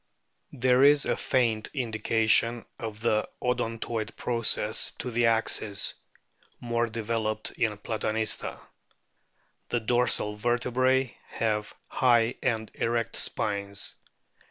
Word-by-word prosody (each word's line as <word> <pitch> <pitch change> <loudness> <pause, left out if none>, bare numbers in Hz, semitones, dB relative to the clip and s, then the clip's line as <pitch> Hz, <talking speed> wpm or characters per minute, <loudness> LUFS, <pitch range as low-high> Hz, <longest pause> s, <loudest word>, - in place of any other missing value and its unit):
There 125 +1 +3
is 145 0 +6
a - - +1
faint 115 -4 0
indication 115 -1 +2
of 110 0 -6
an 110 -2 +3 0.2
odontoid 115 -2 -2
process 115 -2 +1
to 125 - -6
the 120 0 +2
axis, 110 -2 +2 0.7
more 120 -1 0
developed 110 -1 -2
in 110 -3 -1
Platanista. 110 +1 -2 1.1
The 120 - +1
dorsal 115 -2 0
vertebrae 125 +3 +1
have 105 -2 -2
high 120 -2 +3
and 110 -3 -1
erect 115 -1 -1
spines. 100 -1 -1
115 Hz, 100 wpm, -27 LUFS, 110-120 Hz, 1.1 s, is